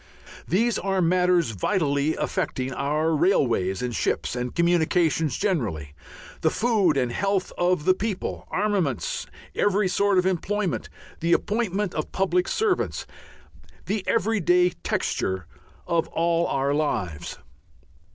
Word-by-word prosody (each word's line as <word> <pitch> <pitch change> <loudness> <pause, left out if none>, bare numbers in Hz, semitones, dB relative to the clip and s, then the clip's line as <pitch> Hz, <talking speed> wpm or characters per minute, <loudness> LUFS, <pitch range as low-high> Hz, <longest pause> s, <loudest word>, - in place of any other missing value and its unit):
These 225 +6 +1
are 195 -1 0
matters 180 -4 +3
vitally 145 - 0
affecting 130 0 -2
our 150 +4 0
railways 120 - +1
and 125 -1 -2
ships - - -1
and 125 0 -4
communications 165 -3 +2
generally, 110 - -1 0.5
the 160 - +3
food 210 - +2
and 125 -2 +1
health 195 +6 -1
of 175 -3 +1
the 185 - +6
people, 195 0 -4
armaments, 210 - -1 0.3
every 205 0 +2
sort 200 +2 +2
of 180 - +3
employment, 190 +1 -1 0.3
the 170 +1 +2
appointment 205 -3 0
of 155 - -3
public 180 -1 +1
servants, 425 -4 0 0.8
the 205 -1 -2
everyday 180 -6 +3
texture 95 - -2 0.4
of 170 -2 0
all 170 0 +1
our 140 +1 0
lives. 95 - -2
175 Hz, 120 wpm, -25 LUFS, 145-195 Hz, 0.8 s, the